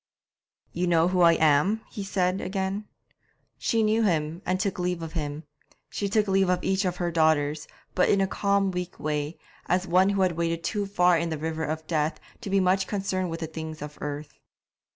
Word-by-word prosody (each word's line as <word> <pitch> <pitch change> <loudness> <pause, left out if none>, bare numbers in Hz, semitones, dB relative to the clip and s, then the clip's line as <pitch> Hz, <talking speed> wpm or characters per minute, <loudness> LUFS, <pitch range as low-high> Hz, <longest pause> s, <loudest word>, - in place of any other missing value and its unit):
'You 180 +2 -1
know 170 0 +3
who 180 -1 +1
I 170 -1 +7
am?' 160 +8 +3
he 205 - -5
said 185 -1 0
again. 190 +2 -2 0.7
She 225 -2 +1
knew 215 +1 +2
him, 165 -4 0
and 185 +1 +1
took 190 -1 -1
leave 180 -1 -1
of 160 -1 -7
him. 150 -2 -4 0.5
She 200 - -2
took 210 +1 +2
leave 190 -1 +3
of 180 -1 +1
each 190 +1 +1
of 180 -1 -1
her 175 -1 -1
daughters, 155 -2 +2 0.3
but 180 - +3
in 200 - +4
a 195 - +3
calm, 200 0 +1
weak 180 0 -5
way, 150 +1 -2 0.3
as 180 +1 +1
one 185 +2 +4
who 200 -1 +1
had 185 - +3
waded 165 0 -2
too 205 -2 -1
far 180 -3 +3
into 165 -1 -2
the 150 - -9
river 160 0 -2
of 160 +1 -4
death 155 -1 -1 0.2
to 220 - -6
be 195 0 +3
much 190 +1 +2
concerned 190 -3 -2
with 165 +1 -5
the - - -1
things 160 0 -7
of 150 0 -9
earth. 145 0 -6
180 Hz, 205 wpm, -26 LUFS, 160-195 Hz, 0.7 s, I